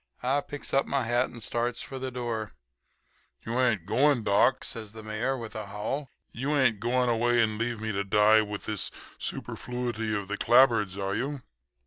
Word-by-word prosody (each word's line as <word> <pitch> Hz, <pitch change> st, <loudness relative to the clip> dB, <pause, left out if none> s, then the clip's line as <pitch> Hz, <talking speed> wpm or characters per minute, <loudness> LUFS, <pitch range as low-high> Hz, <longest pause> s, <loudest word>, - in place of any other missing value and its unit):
"I 135 Hz, +3 st, +2 dB
picks 145 Hz, 0 st, -4 dB
up 135 Hz, -, +3 dB
my 135 Hz, -2 st, 0 dB
hat 120 Hz, +2 st, +1 dB
and 120 Hz, -2 st, -8 dB
starts 120 Hz, +1 st, -1 dB
for 135 Hz, -, -7 dB
the 130 Hz, 0 st, -3 dB
door. 115 Hz, -, -4 dB, 0.9 s
"'You 115 Hz, +2 st, -1 dB
ain't 115 Hz, -9 st, +2 dB
going, 125 Hz, +4 st, +3 dB
doc?' 105 Hz, +6 st, +3 dB
says 110 Hz, -3 st, -5 dB
the 110 Hz, -1 st, -9 dB
Mayor 110 Hz, +5 st, -1 dB
with 115 Hz, -3 st, -7 dB
a 110 Hz, -2 st, -5 dB
howl. 110 Hz, +8 st, -4 dB, 0.2 s
'You 140 Hz, +5 st, -1 dB
ain't 120 Hz, -6 st, +3 dB
going 125 Hz, +3 st, +1 dB
away 120 Hz, +1 st, +2 dB
and 110 Hz, -2 st, +2 dB
leave 115 Hz, -1 st, -1 dB
me 110 Hz, 0 st, -2 dB
to 100 Hz, -1 st, -1 dB
die 105 Hz, +2 st, +5 dB
with 105 Hz, -1 st, -5 dB
this 105 Hz, -2 st, -1 dB, 0.3 s
superfluity 120 Hz, -3 st, -3 dB
of 100 Hz, -2 st, -3 dB
the 105 Hz, +1 st, -4 dB
clapboards, 115 Hz, -6 st, +4 dB
are 100 Hz, 0 st, -2 dB
you?' 140 Hz, 0 st, -3 dB
115 Hz, 185 wpm, -28 LUFS, 110-125 Hz, 0.9 s, die